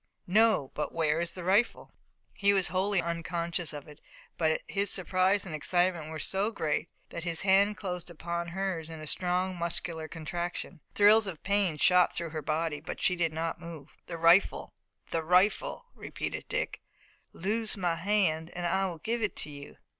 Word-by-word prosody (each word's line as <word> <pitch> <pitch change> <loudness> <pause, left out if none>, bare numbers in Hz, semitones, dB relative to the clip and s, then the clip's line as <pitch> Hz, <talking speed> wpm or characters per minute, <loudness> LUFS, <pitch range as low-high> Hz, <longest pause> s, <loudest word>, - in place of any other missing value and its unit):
"No, 210 -7 +3
but 150 - -4
where 160 -1 +2
is 170 - -3
the 180 - -6
rifle?" 200 +6 +1 0.4
He 200 0 +3
was 190 -4 +1
wholly 190 +1 +1
unconscious 170 0 -2
of 145 -1 -8
it, 150 -1 -14 0.3
but 160 -1 +1
his 200 0 +1
surprise 185 +2 +2
and 175 - -6
excitement 175 0 +1
were 160 - -5
so 195 +6 -1
great 165 -5 -2 0.2
that 170 - -6
his 170 -2 -1
hand 200 +1 +4
closed 180 -3 -4
upon 170 +1 -4
hers 175 -2 -3
in 160 -1 -8
a 155 - -8
strong 180 +3 0
muscular 170 -1 -3
contraction. 170 +1 -5
Thrills 210 +1 +6
of 170 -5 -7
pain 200 -5 +1
shot 180 +3 +4
through 170 -2 -4
her 155 -1 -4
body, 155 +1 -1
but 160 - -7
she 180 - +3
did 170 -2 0
not 165 +1 -3
move. 160 -4 -10
"The 170 - -5
rifle! 170 +4 +4 0.4
The 165 - +1
rifle!" 200 - +2
repeated - - -5
Dick. - - -2 0.5
"Loose 215 +4 -1
my 175 -3 0
hand, 170 -3 +1
and 175 0 -3
I 190 +3 +1
will 175 -3 -6
give 230 +8 -2
it 210 - -1
to 150 - -4
you." 145 0 -11
175 Hz, 175 wpm, -29 LUFS, 160-195 Hz, 0.5 s, Thrills